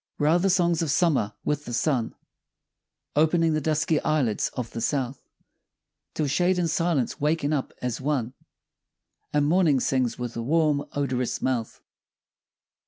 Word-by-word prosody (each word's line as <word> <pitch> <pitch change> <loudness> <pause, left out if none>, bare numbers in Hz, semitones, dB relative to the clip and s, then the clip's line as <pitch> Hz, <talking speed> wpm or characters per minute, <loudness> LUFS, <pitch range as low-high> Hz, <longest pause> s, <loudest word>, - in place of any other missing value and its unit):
Where 150 +1 +2
are 175 - +4
the 195 +2 +2
songs 175 -3 +2
of 165 - -1
Summer? 145 - +2
With 150 0 -1
the 120 - -6
sun, 125 -2 0 1.0
Opening 160 +2 +3
the 155 - 0
dusky 155 +1 +1
eyelids 140 -9 0
of 125 -3 -4
the 115 - -5
south, 135 -1 -1 0.9
Till 155 - 0
shade 175 +6 +2
and 175 -1 +1
silence 165 -5 0
waken 150 0 +1
up 140 -3 -2
as 125 0 -2
one, 130 -4 -1 1.0
And 145 -1 +2
Morning 160 -3 +3
sings 125 -2 0
with 120 -1 -5
a 115 - -3
warm 150 +2 +1
odorous 130 -4 -1
mouth. 125 -4 -2
145 Hz, 150 wpm, -25 LUFS, 125-160 Hz, 1.0 s, are